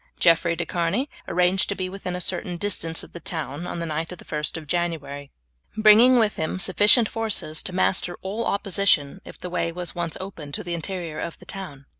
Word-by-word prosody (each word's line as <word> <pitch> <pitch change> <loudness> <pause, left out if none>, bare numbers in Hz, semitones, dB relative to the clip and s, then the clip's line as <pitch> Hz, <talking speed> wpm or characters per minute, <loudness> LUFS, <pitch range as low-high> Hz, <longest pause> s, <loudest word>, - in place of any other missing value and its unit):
Jeffrey 170 0 +4
de 175 - -3
Charny 180 - 0 0.2
arranged 180 +2 +2
to 200 - -1
be 185 -1 -3
within 185 -1 -5
a - - -3
certain 175 -1 -2
distance 165 -4 0
of - - -14
the 170 - -7
town 160 -2 -3
on - - -4
the 170 - -3
night 160 +1 -3
of 180 - -7
the - - -14
1st 150 +1 -2
of 160 - -8
January, 150 -4 -3 0.5
bringing 220 +4 +7
with 220 -3 +2
him 160 +3 -2
sufficient 205 +5 +5
forces 215 -9 0
to - - -6
master 180 -1 0
all 205 +5 -2
opposition 195 -5 +1
if - - -11
the - - -7
way 170 -1 0
was 175 0 -3
once 170 -2 -3
opened 165 -7 -7
to - - -4
the 175 - -4
interior 170 -2 -4
of 170 - -5
the - - -15
town. 150 -9 -8
175 Hz, 210 wpm, -24 LUFS, 165-195 Hz, 0.5 s, bringing